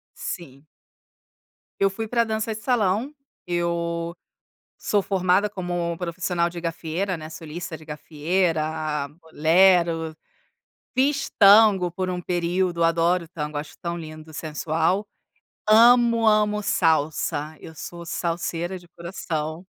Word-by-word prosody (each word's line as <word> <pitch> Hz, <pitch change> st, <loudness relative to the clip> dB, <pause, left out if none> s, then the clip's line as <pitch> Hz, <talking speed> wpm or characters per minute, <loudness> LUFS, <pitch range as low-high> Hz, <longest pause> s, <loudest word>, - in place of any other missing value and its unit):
Sim. 140 Hz, -5 st, -7 dB, 1.1 s
Eu 195 Hz, -, +4 dB
fui 220 Hz, +3 st, -5 dB
para 235 Hz, +1 st, +2 dB
dança 220 Hz, 0 st, -2 dB
de 220 Hz, -, -8 dB
salão, 230 Hz, +2 st, +1 dB, 0.3 s
eu 170 Hz, -1 st, -2 dB, 0.6 s
sou 205 Hz, -, +1 dB
formada 190 Hz, +1 st, +2 dB
como 175 Hz, -3 st, -3 dB
profissional 175 Hz, 0 st, -1 dB
de 170 Hz, 0 st, -7 dB
gafieira, 170 Hz, +3 st, -2 dB
né, 155 Hz, 0 st, -8 dB
solista 160 Hz, +1 st, -7 dB
de 155 Hz, -, -15 dB
gafieira, 155 Hz, -1 st, -1 dB
bolero, 165 Hz, 0 st, +3 dB, 0.8 s
fiz 275 Hz, +2 st, +1 dB
tango 200 Hz, -3 st, +7 dB
por 185 Hz, +1 st, -3 dB
um 180 Hz, -1 st, -3 dB
período, 175 Hz, 0 st, 0 dB
adoro 170 Hz, +1 st, +2 dB
tango, 150 Hz, -3 st, -5 dB
acho 145 Hz, +1 st, -5 dB
tão 170 Hz, 0 st, -3 dB
lindo, 155 Hz, -1 st, -10 dB
sensual. 160 Hz, +6 st, -1 dB, 0.7 s
Amo, 235 Hz, 0 st, +6 dB
amo 210 Hz, -1 st, +3 dB
salsa, 155 Hz, -4 st, 0 dB
eu 160 Hz, -, -10 dB
sou 170 Hz, +2 st, -8 dB
salseira 170 Hz, +1 st, -2 dB
de 175 Hz, -, -19 dB
coração. 170 Hz, -1 st, -5 dB
175 Hz, 115 wpm, -24 LUFS, 160-195 Hz, 1.1 s, tango